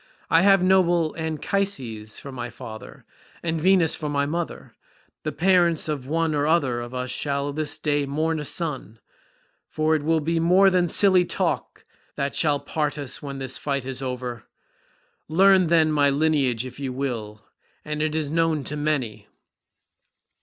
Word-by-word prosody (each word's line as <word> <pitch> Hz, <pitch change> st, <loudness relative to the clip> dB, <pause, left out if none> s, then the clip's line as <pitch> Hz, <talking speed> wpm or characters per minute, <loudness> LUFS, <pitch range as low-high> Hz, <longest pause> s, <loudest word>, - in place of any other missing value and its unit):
I 165 Hz, -, +6 dB
have 195 Hz, -1 st, +5 dB
noble 175 Hz, -4 st, +3 dB
Anchises 155 Hz, -, -3 dB
for 140 Hz, -, -9 dB
my 125 Hz, -2 st, -5 dB
father, 110 Hz, -2 st, -10 dB, 0.4 s
and 165 Hz, -1 st, -1 dB
Venus 185 Hz, -2 st, +4 dB
for 150 Hz, -2 st, -4 dB
my 140 Hz, -1 st, 0 dB
mother; 170 Hz, +3 st, -4 dB, 0.5 s
the -, -, -3 dB
parents 175 Hz, -3 st, +2 dB
of 145 Hz, -4 st, -4 dB
one 165 Hz, +1 st, 0 dB
or 145 Hz, 0 st, 0 dB
other 135 Hz, -7 st, +1 dB
of 120 Hz, +1 st, -8 dB
us 125 Hz, 0 st, -3 dB
shall 140 Hz, 0 st, -2 dB
this 155 Hz, 0 st, -2 dB
day 145 Hz, -2 st, 0 dB
mourn 155 Hz, +3 st, -1 dB
a -, -, -4 dB
son, 145 Hz, -8 st, -3 dB, 0.7 s
for 155 Hz, 0 st, 0 dB
it 155 Hz, -, -1 dB
will 160 Hz, +2 st, +1 dB
be 165 Hz, +2 st, -1 dB
more 185 Hz, +4 st, +5 dB
than 180 Hz, -1 st, +2 dB
silly 185 Hz, +1 st, +5 dB
talk -, -, -2 dB, 0.3 s
that 140 Hz, 0 st, -2 dB
shall 145 Hz, -3 st, +2 dB
part 150 Hz, -1 st, -2 dB
us 140 Hz, -3 st, -5 dB
when 140 Hz, -1 st, -6 dB
the 135 Hz, -1 st, -4 dB
fight 140 Hz, 0 st, -2 dB
is 135 Hz, 0 st, -4 dB
over. 125 Hz, -3 st, -5 dB, 0.8 s
Learn, 185 Hz, +2 st, +5 dB
then, 160 Hz, -1 st, +3 dB
my 145 Hz, -2 st, +3 dB
lineage 140 Hz, -5 st, +1 dB
if 130 Hz, +1 st, -9 dB
you 135 Hz, -2 st, -3 dB
will—and 125 Hz, +4 st, -6 dB
it 155 Hz, 0 st, -1 dB
is 155 Hz, -2 st, -2 dB
known 165 Hz, -2 st, +1 dB
to 150 Hz, -, -4 dB
many. 145 Hz, -7 st, -2 dB
150 Hz, 160 wpm, -24 LUFS, 135-165 Hz, 0.8 s, I